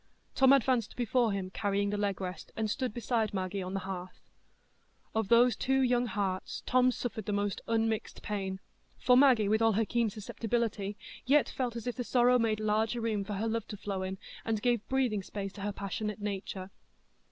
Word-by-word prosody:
Tom 265 0 +5
advanced 255 -4 +3
before 240 -1 +2
him, 190 -2 -3
carrying 200 0 0
the - - -1
leg 205 -2 -1
rest, 185 -1 -6
and 220 -1 -1
stood 255 0 -1
beside 225 -2 -1
Maggie 190 +1 -2
on 185 +1 -4
the 195 - -1
hearth. 185 -1 -6 0.9
Of 220 -2 0
those 240 +2 +5
two 265 +1 +1
young 245 -1 +2
hearts 195 -3 -3
Tom's 255 0 +3
suffered 220 -4 -4
the - - 0
most 205 -1 -1
unmixed 225 -1 -1
pain, 195 -2 -3 0.4
for 250 - +4
Maggie, 250 -6 +6
with 220 +2 +2
all 225 -1 +4
her 220 +2 +2
keen 235 0 +1
susceptibility, 215 -1 -2 0.3
yet 290 +2 +4
felt 245 -3 -2
as 235 - -5
if 245 0 -3
the 250 - -1
sorrow 245 +1 +4
made 220 -2 +1
larger 215 +2 +1
room 220 -3 -1
for 205 - -5
her 210 +3 -1
love 225 -1 -2
to 210 - -7
flow 200 -1 -3
in, 190 0 -3 0.3
and 220 -2 -1
gave 240 -3 +1
breathing 255 -6 +1
space 195 0 -5
to 200 - -9
her 205 +1 -1
passionate 205 +2 -4
nature. 195 -2 -4
215 Hz, 195 wpm, -31 LUFS, 200-240 Hz, 0.9 s, Maggie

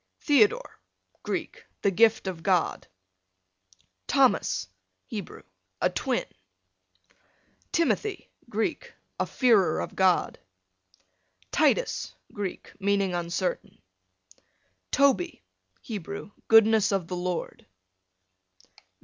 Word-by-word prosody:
Theodore, 290 - +2 0.4
Greek, - - -4 0.2
the 200 - +3
gift 220 +3 +4
of 180 -3 -4
God. 180 -2 +1 1.2
Thomas, 95 - +2 0.4
Hebrew, 210 -3 -7 0.4
a - - +2
twin. - - -1 1.5
Timothy, 385 +4 0 0.2
Greek, - - -3 0.2
a - - 0
fearer 210 -11 +3
of - - -5
God. 185 -2 +2 1.1
Titus, 95 - +1 0.2
Greek, 200 -3 -5
meaning 200 -1 +1
uncertain. 175 - -3 1.1
Toby, 280 +5 +2 0.4
Hebrew, 200 -2 -6 0.2
goodness 220 -1 +5
of 195 -4 -1
the 180 - -4
Lord. 180 -1 -4
200 Hz, 80 wpm, -27 LUFS, 180-230 Hz, 1.5 s, goodness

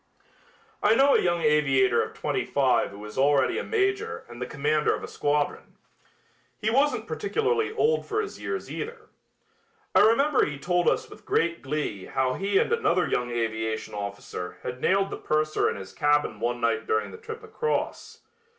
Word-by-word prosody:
I 215 +2 +4
know 275 +3 +5
a - - +4
young 175 -1 +1
aviator 140 -4 +3
of - - -5
twenty - - -1
five - - +2
who 100 +1 -10
is 105 +4 -6
already 140 +1 +3
a - - -3
major 405 +1 -1
and 120 +1 -11
the 125 - -2
commander 150 +2 +1
of - - -8
a - - -5
squadron. 145 0 -2 0.8
He 220 0 0
wasn't 280 +4 +2
particularly 445 0 0
old 455 +1 +1
for 430 0 -1
his 430 -1 -5
years, 400 -2 -4
either. 450 0 -6 0.8
I - - +6
remember 275 +6 +4
he 145 -1 -2
told 175 +5 +2
us - - -1
with - - -14
great 170 0 0
glee 135 -9 -3
how 130 -1 0
he 195 +5 0
and 450 - +2
another 425 - +2
young 125 0 -1
aviation 110 -2 -2
officer 100 -3 -6
had 125 +1 -5
nailed 195 +1 +2
the - - -4
purser 155 0 +1
in - - -3
his 95 -1 -9
cabin 145 0 +1
one 120 +1 -1
night 115 -1 0
during 440 0 0
the - - -9
trip 450 0 -8
across. 460 +1 -3
155 Hz, 180 wpm, -26 LUFS, -, 0.8 s, I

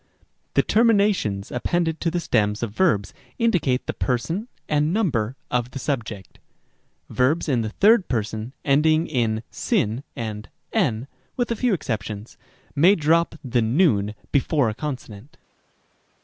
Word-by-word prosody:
c. - - -34 0.3
The - - +5
terminations 200 - +2
appended 160 +6 -1
to 170 - +1
the 175 +1 -1
stems 105 -8 0
of 115 - -2
verbs 105 - +1 0.2
indicate 180 - +1
the - - -2
person 165 - -2 0.2
and 150 +1 +1
number 135 - 0 0.2
of 125 -1 0
the 130 - -8
subject. 115 -8 -4 0.7
Rem. - - -12
d. - - -12
Verbs 135 +8 +2
in 130 -5 +2
the 110 - -2
third 200 - +4
person 110 0 -3
ending 155 +3 +3
in 115 -7 -1 0.3
ow 110 +5 +1
and 110 -2 -5 0.2
ev 110 +2 +1 0.3
(with 245 -2 0
a - - +1
few 235 -2 +1
exceptions) 110 - -5 0.4
may 175 +8 +6
drop 165 +1 +2
the 125 -2 +1
v 110 - +2 0.2
before 140 -2 +2
a - - -3
consonant. 130 0 -7
130 Hz, 150 wpm, -23 LUFS, 110-170 Hz, 0.7 s, may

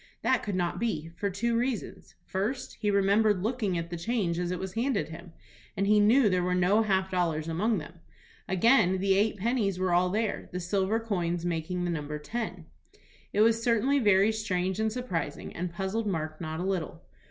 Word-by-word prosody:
That 260 -2 +2
could 205 -3 -3
not 175 -2 -1
be, 165 -9 -2
for 200 +4 -1
two 230 +5 -1
reasons: 240 -1 -3
First, 215 +8 -3
he 210 - +1
remembered 200 0 +3
looking 215 -5 -1
at 170 0 -4
the 175 - -3
change 175 -3 -1
as 175 -1 -1
it 180 - -2
was 190 +1 -5
handed 230 - 0
him, 170 +2 -10 0.5
and 195 - +1
he 210 +1 +4
knew 225 +7 +5
that 210 - +4
there 185 -1 +1
were 180 0 +1
no 185 +4 +3
half 190 -3 +1
dollars 165 -4 0
among 205 +7 +1
them. 170 +1 -8 0.5
Again, 190 0 +4
the 195 +1 +2
eight 210 +2 +2
pennies 205 -2 0
were 185 -1 0
all 180 +1 +3
there, 215 +2 -2
the 180 - -3
silver 195 +4 0
coins 175 -6 -2
making 175 +1 -2
the 175 - -1
number 150 -2 -3
ten. 185 0 -5 0.7
It 210 - +2
was 230 +1 +4
certainly 240 +4 +2
very 205 -2 +4
strange 190 -3 -2
and 220 0 +1
surprising, 180 - -4
and 180 0 -3
puzzled 195 +5 -2
Mark 155 -4 -3
not 160 -1 -4
a - - -2
little. 180 -3 -3
190 Hz, 200 wpm, -28 LUFS, 175-220 Hz, 0.7 s, knew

